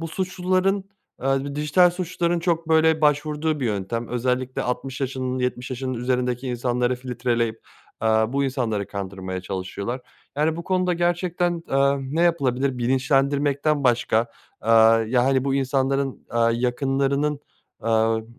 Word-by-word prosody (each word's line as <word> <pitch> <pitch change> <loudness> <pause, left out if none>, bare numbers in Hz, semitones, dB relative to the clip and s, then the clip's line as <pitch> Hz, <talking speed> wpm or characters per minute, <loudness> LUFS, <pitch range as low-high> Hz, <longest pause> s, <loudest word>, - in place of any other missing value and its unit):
bu 165 - -4
suçluların, 185 +2 0 0.4
eee, 135 0 +1
b 140 0 -5
dijital 150 +5 +4
suçluların 175 -1 -1
çok, 165 -1 -1
böyle, 160 0 +4
başvurduğu 150 0 +1
bir 125 - 0
yöntem 110 +3 -3
özellikle 125 +1 -1
60 125 +2 -4
yaşının, 130 -1 -2
70 125 0 -2
yaşının 130 0 -3
üzerindeki 125 +1 -1
insanları 125 0 0
filtreleyip, 120 -3 -2 0.4
eee, 110 - +2
bu 110 +6 +2
insanları 115 -7 -1
kandırmaya 95 -1 -5
çalışıyorlar. 95 +6 -4 0.4
Yani, 155 +2 +1
bu 170 - -6
konuda 185 -1 +1
gerçekten, 175 0 0
eee, 140 +1 +3 0.2
ne 170 - +3
yapılabilir 135 -6 +1
bilinçlendirmekten 140 +3 +1
başka. 120 -1 +2 0.4
Eee, 115 - -4 0.4
ya, 125 0 +3
hani, 135 0 +2
bu 135 -1 0
insanların, 135 0 0
eee, 115 - +2 0.2
yakınlarının, 140 +3 0 0.4
eee, 110 0 +2
135 Hz, 135 wpm, -23 LUFS, 125-155 Hz, 0.4 s, dijital